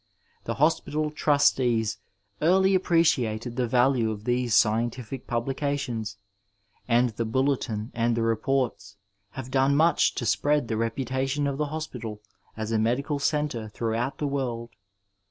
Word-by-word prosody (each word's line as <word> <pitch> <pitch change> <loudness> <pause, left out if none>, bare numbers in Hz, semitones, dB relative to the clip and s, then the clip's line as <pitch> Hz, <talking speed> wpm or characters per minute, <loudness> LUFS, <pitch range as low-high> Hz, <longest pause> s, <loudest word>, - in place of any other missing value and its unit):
The - - -2
Hospital 155 0 +1
Trustees 125 -8 +2 0.4
early 190 +4 +4
appreciated 125 - +1
the 125 -1 0
v&lne 125 -1 +2
of 105 -1 -7
these 120 -1 +1
scientifio 120 +3 +1
pnblicataons, 120 -3 -2 0.7
and 120 +1 +3
the 115 +1 -3
Bulletin 125 -2 -1
and 115 0 0
the 115 - +1
Reports 115 -3 -1 0.4
have 130 -1 -7
done 135 +1 +3
much 165 +3 +3
to 120 - -3
spread 145 +3 +1
the 110 - -1
reputation 130 +5 -1
of 140 0 -2
the 150 - 0
Hospital 125 -9 -6 0.4
as 110 0 -3
a 110 - +2
medical 140 +6 0
centre 140 -7 -1
through 115 +1 -3
out 120 +5 -2
the 150 - -2
world. 125 -4 -3
125 Hz, 135 wpm, -26 LUFS, 115-140 Hz, 0.7 s, early